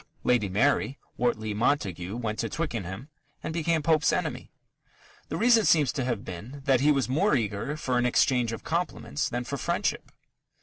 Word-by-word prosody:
Lady 120 Hz, -5 st, +2 dB
Mary, 135 Hz, +6 st, +1 dB, 0.2 s
Wortley 110 Hz, -3 st, -1 dB
Montagu 105 Hz, -, -1 dB
went 110 Hz, -3 st, -3 dB
to 115 Hz, -, -1 dB
Twickenham 120 Hz, -, -4 dB, 0.3 s
and -, -, -3 dB
became 165 Hz, -1 st, 0 dB
Pope's 160 Hz, 0 st, +3 dB
enemy. -, -, -2 dB, 0.8 s
The -, -, -2 dB
reason 230 Hz, -1 st, +5 dB
seems 150 Hz, -, +4 dB
to 135 Hz, -, -2 dB
have 120 Hz, -4 st, -2 dB
been 115 Hz, +11 st, -8 dB
that 135 Hz, -2 st, +4 dB
he 150 Hz, +2 st, +5 dB
was 135 Hz, -5 st, +1 dB
more 155 Hz, +8 st, +2 dB
eager 110 Hz, +5 st, -2 dB
for 130 Hz, -5 st, 0 dB
an 120 Hz, -, +1 dB
exchange 125 Hz, -2 st, +2 dB
of 115 Hz, -, -6 dB
compliments 170 Hz, -3 st, -2 dB
than 120 Hz, +1 st, -2 dB
for 140 Hz, +3 st, -4 dB
friendship. -, -, -2 dB
125 Hz, 170 wpm, -27 LUFS, 110-150 Hz, 0.8 s, reason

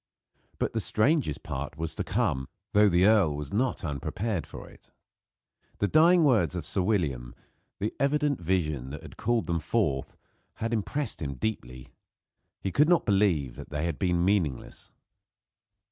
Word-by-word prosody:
But -, -, -1 dB
the 115 Hz, -, 0 dB
strangest 110 Hz, -, +1 dB
part 70 Hz, +2 st, -5 dB
was 80 Hz, 0 st, -3 dB
to -, -, -3 dB
come; 65 Hz, 0 st, -1 dB, 0.2 s
though 105 Hz, 0 st, +6 dB
the 90 Hz, +1 st, +4 dB
earl 100 Hz, -9 st, +4 dB
was 75 Hz, -1 st, -6 dB
not 125 Hz, +5 st, 0 dB
unprepared 80 Hz, +7 st, -3 dB
for -, -, -9 dB
it. -, -, -18 dB, 0.9 s
The 100 Hz, -, +1 dB
dying 170 Hz, -, +5 dB
words 110 Hz, -, +3 dB
of 85 Hz, -4 st, -4 dB
Sir 95 Hz, -, 0 dB
William 75 Hz, -, -1 dB, 0.4 s
the 105 Hz, +2 st, -2 dB
evident 145 Hz, -, +1 dB
vision 75 Hz, -7 st, -1 dB
that 70 Hz, +2 st, -8 dB
had -, -, -11 dB
called 120 Hz, 0 st, 0 dB
them 85 Hz, -1 st, -1 dB
forth 80 Hz, -6 st, -1 dB, 0.4 s
had 115 Hz, +1 st, -3 dB
impressed 125 Hz, +5 st, -1 dB
him 70 Hz, -3 st, -3 dB
deeply. 65 Hz, -, -5 dB, 0.7 s
He 95 Hz, -, -2 dB
could 150 Hz, -, +3 dB
not 175 Hz, -, +3 dB
believe 95 Hz, -, +1 dB
they 75 Hz, +2 st, -2 dB
had 85 Hz, -3 st, -3 dB
been 90 Hz, -2 st, +1 dB
meaningless. 90 Hz, -10 st, -1 dB
90 Hz, 155 wpm, -28 LUFS, 75-110 Hz, 0.9 s, though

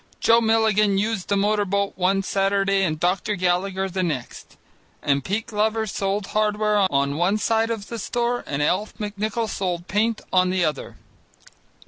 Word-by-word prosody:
Joe 230 Hz, +1 st, +4 dB
Milligan 220 Hz, -3 st, +3 dB
used 210 Hz, -1 st, -1 dB
the 200 Hz, -, +1 dB
motor 205 Hz, +1 st, +2 dB
boat 200 Hz, 0 st, -1 dB
one 190 Hz, +2 st, +1 dB
Saturday 195 Hz, 0 st, +1 dB
and 155 Hz, -5 st, 0 dB
Dr. 185 Hz, +4 st, 0 dB
Gallagher 185 Hz, +1 st, 0 dB
the 190 Hz, 0 st, -3 dB
next, 150 Hz, -9 st, -5 dB, 0.5 s
and 140 Hz, -1 st, +1 dB
Pete 210 Hz, +3 st, -2 dB
Glover 220 Hz, 0 st, 0 dB
sold 200 Hz, 0 st, -2 dB
hardware 210 Hz, -2 st, +2 dB
on 140 Hz, +1 st, 0 dB
one 180 Hz, +5 st, +2 dB
side 225 Hz, +1 st, +1 dB
of 225 Hz, -3 st, -3 dB
the 230 Hz, +1 st, -6 dB
store 240 Hz, +1 st, -1 dB
and 145 Hz, +1 st, -1 dB
Alf 185 Hz, +8 st, 0 dB
McNichol 210 Hz, +2 st, -3 dB
sold 180 Hz, -4 st, -3 dB
paint 220 Hz, +2 st, 0 dB
on 185 Hz, 0 st, +4 dB
the 185 Hz, -2 st, +1 dB
other. 150 Hz, -3 st, -4 dB
200 Hz, 160 wpm, -23 LUFS, 185-215 Hz, 0.5 s, Joe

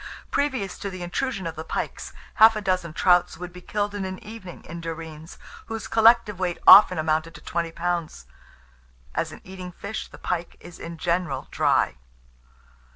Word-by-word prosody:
Previous 260 Hz, -10 st, -1 dB
to 200 Hz, -, -4 dB
the 185 Hz, -2 st, -7 dB
intrusion 195 Hz, +2 st, -2 dB
of 165 Hz, -1 st, -4 dB
the 160 Hz, -, -6 dB
pikes, -, -, -4 dB, 0.3 s
half 220 Hz, 0 st, +9 dB
a 215 Hz, -, -2 dB
dozen 185 Hz, -4 st, -1 dB
trouts 180 Hz, +1 st, +3 dB
would 180 Hz, +1 st, -8 dB
be 180 Hz, -, -11 dB
killed 205 Hz, +2 st, -2 dB
in 205 Hz, -1 st, -3 dB
an 190 Hz, 0 st, -4 dB
evening 210 Hz, -5 st, -10 dB
in 170 Hz, +1 st, -7 dB
Derreens, 160 Hz, -1 st, -7 dB, 0.3 s
whose 225 Hz, -1 st, -5 dB
collective 225 Hz, -3 st, +4 dB
weight 180 Hz, -2 st, -1 dB
often 190 Hz, -2 st, +9 dB
amounted 155 Hz, +1 st, 0 dB
to -, -, -11 dB
twenty 170 Hz, -1 st, -3 dB
pounds." 170 Hz, -, -3 dB, 0.9 s
As -, -, -2 dB
an -, -, -11 dB
eating 185 Hz, -1 st, -8 dB
fish, 200 Hz, +5 st, -6 dB
the -, -, -14 dB
pike 175 Hz, -1 st, -3 dB
is 175 Hz, 0 st, -12 dB
in 165 Hz, 0 st, -7 dB
general 170 Hz, -5 st, -1 dB
dry. -, -, +2 dB
180 Hz, 170 wpm, -25 LUFS, 165-205 Hz, 0.9 s, half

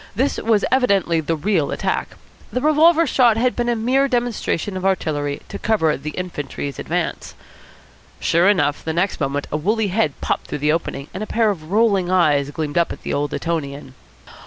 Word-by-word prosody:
This 265 Hz, +6 st, 0 dB
was 215 Hz, -2 st, +2 dB
evidently 200 Hz, -10 st, +2 dB
the 165 Hz, +2 st, -1 dB
real 165 Hz, -2 st, 0 dB
attack. -, -, -2 dB, 0.4 s
The 250 Hz, -, -1 dB
revolver 315 Hz, +4 st, +4 dB
shot 245 Hz, -6 st, +3 dB
had 250 Hz, +2 st, +1 dB
been 240 Hz, 0 st, -1 dB
a 240 Hz, -, +2 dB
mere 255 Hz, +5 st, +2 dB
demonstration 240 Hz, -, -1 dB
of 185 Hz, -, -4 dB
artillery 150 Hz, -7 st, -1 dB
to -, -, -6 dB
cover 160 Hz, -9 st, +1 dB
the 145 Hz, +3 st, -6 dB
infantry's 145 Hz, -5 st, -5 dB
advance. -, -, -3 dB, 0.8 s
Sure 170 Hz, +4 st, +3 dB
enough, 150 Hz, -8 st, +1 dB
the 160 Hz, -, -2 dB
next 180 Hz, +4 st, 0 dB
moment 140 Hz, 0 st, -1 dB
a 150 Hz, -, 0 dB
woolly 210 Hz, +6 st, 0 dB
head 180 Hz, -7 st, 0 dB
popped -, -, -2 dB
through -, -, -4 dB
the 150 Hz, +1 st, +1 dB
opening, 140 Hz, -4 st, -3 dB
and 185 Hz, -, -5 dB
a 215 Hz, -, -4 dB
pair 225 Hz, -2 st, +2 dB
of 160 Hz, -5 st, -8 dB
rolling 200 Hz, -4 st, +2 dB
eyes 150 Hz, -6 st, +3 dB
gleamed 150 Hz, +1 st, -2 dB
up 170 Hz, -, +1 dB
at -, -, -8 dB
the -, -, -3 dB
old 145 Hz, 0 st, -1 dB
Etonian. 140 Hz, -5 st, -4 dB
185 Hz, 185 wpm, -20 LUFS, 150-225 Hz, 0.8 s, revolver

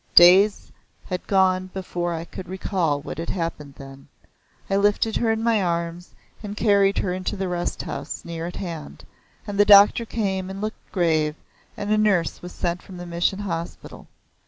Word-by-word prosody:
Days 190 Hz, +4 st, +6 dB, 0.3 s
had 180 Hz, -2 st, -5 dB
gone 185 Hz, -1 st, +2 dB
before 175 Hz, -2 st, -3 dB
I 165 Hz, 0 st, -4 dB
could 180 Hz, 0 st, -9 dB
recall 180 Hz, -6 st, -1 dB
what 150 Hz, -, -7 dB
had 165 Hz, -, -4 dB
happened 160 Hz, -5 st, -4 dB
then. 135 Hz, 0 st, -12 dB, 0.6 s
I 195 Hz, -, 0 dB
lifted 205 Hz, +2 st, +2 dB
her 230 Hz, -1 st, +1 dB
in 225 Hz, 0 st, -1 dB
my 230 Hz, -3 st, +2 dB
arms 170 Hz, 0 st, -3 dB, 0.3 s
and 210 Hz, -1 st, -7 dB
carried 200 Hz, -2 st, +3 dB
her 180 Hz, -, 0 dB
into 185 Hz, +2 st, -3 dB
the 190 Hz, 0 st, -2 dB
rest 175 Hz, -1 st, -3 dB
house -, -, -6 dB
near 165 Hz, 0 st, -5 dB
at 175 Hz, -, -7 dB
hand, 170 Hz, -5 st, -7 dB, 0.4 s
and 205 Hz, -1 st, -5 dB
the -, -, +8 dB
doctor 205 Hz, +3 st, +7 dB
came 190 Hz, -4 st, -2 dB
and 195 Hz, 0 st, -6 dB
looked 215 Hz, +2 st, -6 dB
grave, 155 Hz, -4 st, +1 dB, 0.4 s
and 205 Hz, +1 st, -3 dB
a 215 Hz, -, +3 dB
nurse 195 Hz, -6 st, +1 dB
was 180 Hz, -, -8 dB
sent 175 Hz, 0 st, -2 dB
from 185 Hz, -, -11 dB
the 175 Hz, -, -7 dB
Mission 175 Hz, +2 st, 0 dB
Hospital. 170 Hz, -4 st, -6 dB
185 Hz, 180 wpm, -23 LUFS, 170-200 Hz, 0.6 s, the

